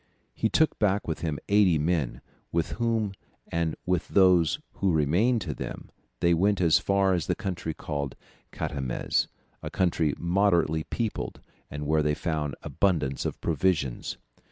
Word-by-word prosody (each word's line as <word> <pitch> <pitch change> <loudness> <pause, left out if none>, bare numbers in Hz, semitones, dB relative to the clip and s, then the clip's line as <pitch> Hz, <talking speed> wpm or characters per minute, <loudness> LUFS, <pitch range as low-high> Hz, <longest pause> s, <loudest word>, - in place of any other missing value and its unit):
He 110 - 0
took 160 +6 +2
back 105 -1 +1
with 80 - -2
him 80 -3 -2
eighty 100 -5 +4
men, 75 -4 0 0.3
with 85 -1 0
whom 115 -3 +1 0.4
and 85 -1 0
with 90 -1 0
those 90 -5 +4 0.2
who 95 -1 +2
remained 90 - +2
to 80 -5 -3
them, - - -7 0.3
they 85 0 +4
went 100 +3 +2
as 85 -3 +5
far 100 -1 +2
as 85 -3 -1
the - - +1
country 90 -7 -4
called 70 -4 -4 0.4
Catamez, 65 -4 -1 0.3
a - - -5
country 85 -5 +1
moderately 85 -3 +2
peopled 115 -3 -3 0.3
and 75 0 -5
where 75 +1 +2
they 75 0 +1
found 75 -4 -2
abundance 80 -9 0
of - - -5
provisions. 80 -6 0
85 Hz, 150 wpm, -27 LUFS, 75-95 Hz, 0.4 s, as